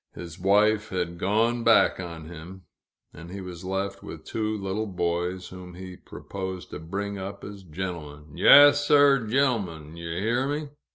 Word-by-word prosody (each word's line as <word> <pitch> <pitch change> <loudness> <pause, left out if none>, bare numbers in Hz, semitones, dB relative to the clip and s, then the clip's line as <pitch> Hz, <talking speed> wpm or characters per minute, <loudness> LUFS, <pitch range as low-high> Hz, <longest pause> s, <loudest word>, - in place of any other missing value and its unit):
His 85 -2 -9
wife 105 +3 +3
had 85 -2 -3
"gone 115 +5 +1
back 115 -4 +4
on 85 -3 -7
him," 85 +3 -10 0.5
and 85 +2 -11
he 100 +2 -7
was 90 -1 -8
left 95 +1 -3
with 80 -1 -10
two 110 -1 -2
little 100 +2 -3
boys, 90 0 -2
whom 90 -1 -10
he 95 0 -9
proposed 95 0 -7
to - - -6
bring 100 +5 -4
up 100 +1 -7
as 100 -1 -9
gentlemen 75 -4 -7
"yaas, 145 0 +8
sir 145 -2 +5
r, 110 - -7
gen'lem'n, 100 - -1
yew 85 0 -7
hear 120 +6 0
me! 145 +1 -3
95 Hz, 165 wpm, -26 LUFS, 85-110 Hz, 0.5 s, yaas